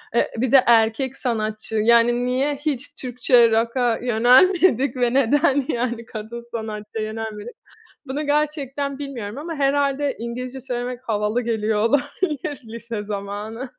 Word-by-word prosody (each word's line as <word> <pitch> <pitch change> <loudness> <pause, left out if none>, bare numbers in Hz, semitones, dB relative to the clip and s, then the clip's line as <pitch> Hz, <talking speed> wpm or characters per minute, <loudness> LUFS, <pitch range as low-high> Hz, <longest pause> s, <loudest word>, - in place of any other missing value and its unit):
Eee, - - +2
bir 240 +1 0
de 270 -2 +7
erkek 235 +3 +3
sanatçı. 220 -3 -3
Yani 235 +2 +3
niye 265 +4 0
hiç 285 -2 -4
Türkçe 245 -2 +3
rock'a 235 +1 +1
yönelmedik 255 - +4
ve 245 -1 +1
neden 275 +1 +3
yani 235 -1 -2
kadın 225 +1 -7
sanatçıya 215 -1 -5
yönelmedik? 220 +1 -6 0.5
Bunu 285 +3 -3
gerçekten 285 -2 -1
bilmiyorum 245 -6 -6
ama 325 +3 -5
herhâlde 280 0 +1
İngilizce 250 +3 -5
söylemek 250 0 -4
havalı 210 +2 0
geliyor 220 -2 -1
olabilir 290 +3 -1
lise 230 -1 -6
zamanı. 210 +4 -5
245 Hz, 125 wpm, -22 LUFS, 225-275 Hz, 0.5 s, de